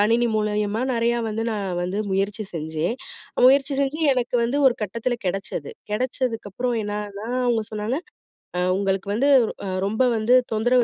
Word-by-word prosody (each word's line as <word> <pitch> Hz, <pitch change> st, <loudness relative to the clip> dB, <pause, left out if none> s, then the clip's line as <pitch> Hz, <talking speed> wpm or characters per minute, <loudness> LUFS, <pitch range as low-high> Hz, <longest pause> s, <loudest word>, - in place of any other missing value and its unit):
கணினி 230 Hz, +3 st, +3 dB
மூலியமா 210 Hz, +1 st, 0 dB
நெறையா 235 Hz, 0 st, +1 dB
வந்து 225 Hz, +1 st, -2 dB
நான் 205 Hz, -2 st, -2 dB, 0.2 s
வந்து 185 Hz, +3 st, -2 dB
முயற்சி 200 Hz, +3 st, -1 dB
செஞ்சேன். 160 Hz, +5 st, -2 dB, 0.5 s
முயற்சி 275 Hz, +2 st, +5 dB
செஞ்சு 280 Hz, +4 st, -2 dB
எனக்கு 250 Hz, 0 st, 0 dB
வந்து 250 Hz, +5 st, 0 dB
ஒரு 240 Hz, -, -2 dB
கட்டத்துல 230 Hz, +4 st, -1 dB
கெடச்சது. 180 Hz, -6 st, -3 dB, 0.2 s
கெடச்சதுக்கப்புறம் 245 Hz, -1 st, -1 dB
என்னான்னா, 205 Hz, +1 st, -5 dB, 0.2 s
அவுங்க 230 Hz, -2 st, +2 dB
சொன்னாங்க, 215 Hz, +6 st, -1 dB, 0.6 s
அ -, -, +1 dB, 0.2 s
உங்களுக்கு 195 Hz, 0 st, -1 dB
வந்து 250 Hz, +7 st, +2 dB, 0.4 s
அ -, -, -3 dB, 0.2 s
ரொம்ப 220 Hz, +6 st, +1 dB
வந்து 220 Hz, +3 st, +2 dB, 0.2 s
தொந்தரவு 245 Hz, +3 st, +3 dB
220 Hz, 145 wpm, -23 LUFS, 205-245 Hz, 0.6 s, முயற்சி